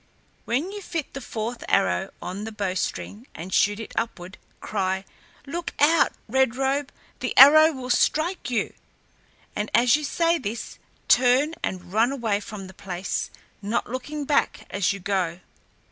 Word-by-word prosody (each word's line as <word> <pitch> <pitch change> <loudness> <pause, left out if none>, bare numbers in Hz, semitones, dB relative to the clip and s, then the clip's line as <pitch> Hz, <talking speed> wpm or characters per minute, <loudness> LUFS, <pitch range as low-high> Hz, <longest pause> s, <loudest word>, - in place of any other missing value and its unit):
When 280 +11 -1
you 410 0 -7
fit 330 -5 -5
the 275 - -6
fourth 230 0 -5
arrow 90 -1 +2
on 185 +3 -5
the 220 - -5
bowstring 205 +3 -3
and 175 +3 -7
shoot 205 +1 +3
it 225 - -8
upward, 190 -4 -4 0.2
cry, 190 -2 -2 0.4
'Look 335 +4 -5
out, 305 +2 +4
Red 260 0 +2
Robe, 270 +1 0 0.3
the - - -3
arrow 310 +4 +9
will 255 -3 -5
strike 310 0 +1
you!' 240 - -1 0.8
and 210 +1 -2
as 240 +2 +5
you 300 - -2
say 335 +3 +1
this, 230 -1 -6 0.3
turn 260 +5 +4
and 185 0 -5
run 225 +4 +3
away 225 -7 0
from 205 -1 -8
the 190 - -12
place, 185 -1 -4 0.3
not 220 +3 -2
looking 290 +3 -4
back 290 0 +1
as 200 -2 +1
you 200 - -5
go. 180 -3 -1
235 Hz, 155 wpm, -25 LUFS, 200-280 Hz, 0.8 s, arrow